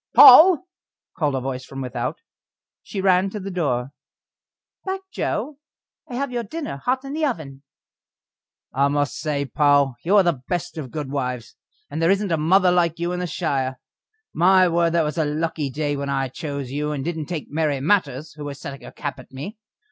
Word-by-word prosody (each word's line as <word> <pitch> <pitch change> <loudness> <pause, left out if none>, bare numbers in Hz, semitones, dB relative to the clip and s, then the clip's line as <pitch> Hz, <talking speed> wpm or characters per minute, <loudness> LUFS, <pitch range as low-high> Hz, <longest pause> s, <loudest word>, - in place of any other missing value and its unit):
"Poll!" 360 +1 +9 0.5
called 145 -4 0
a - - 0
voice 130 0 -4
from 135 +1 -9
without; 125 -3 -4 0.6
she 195 - -5
ran 190 0 +3
to 210 - -6
the 195 0 -6
door. 135 -8 -1 0.9
"Back, 385 0 -3
Joe! 290 -1 -3 0.5
I 245 - -5
have 275 +1 -2
your 240 -1 -1
dinner 285 - -5
hot 255 - -1
in 275 - -6
the 315 +1 -2
oven." 155 - -3 1.1
"I 140 +2 +3
must 145 0 0
say, 145 -2 -1
Poll, 145 -1 +3
you 195 +5 +3
are 200 - +7
the 170 -8 0
best 175 -2 -3
of 135 -4 -6
good 145 0 -5
wives, 125 -4 -3 0.3
and 155 +3 -4
there 165 - +3
isn't 200 -1 +1
a 165 - +2
mother 180 +4 +4
like 170 -2 +2
you 170 +1 -2
in 180 - -2
the 180 - -2
shire. 135 -6 -2 0.5
My 185 +2 +5
word! 170 -1 +2
that 170 -1 +3
was 150 +2 -2
a - - +3
lucky 150 -1 -2
day 145 +2 -2
when 140 0 -4
I 135 -1 -1
chose 140 -2 -5
you, 150 +2 -2
and 140 -2 -3
didn't 160 -3 -3
take 165 -6 -5
Mary 150 -2 0
Matters, 150 -3 0
who 150 0 -8
was 140 -1 -6
setting 140 -1 -8
her - - -10
cap 145 -2 -5
at 130 - -14
me. 190 - -8
155 Hz, 195 wpm, -22 LUFS, 140-185 Hz, 1.1 s, Poll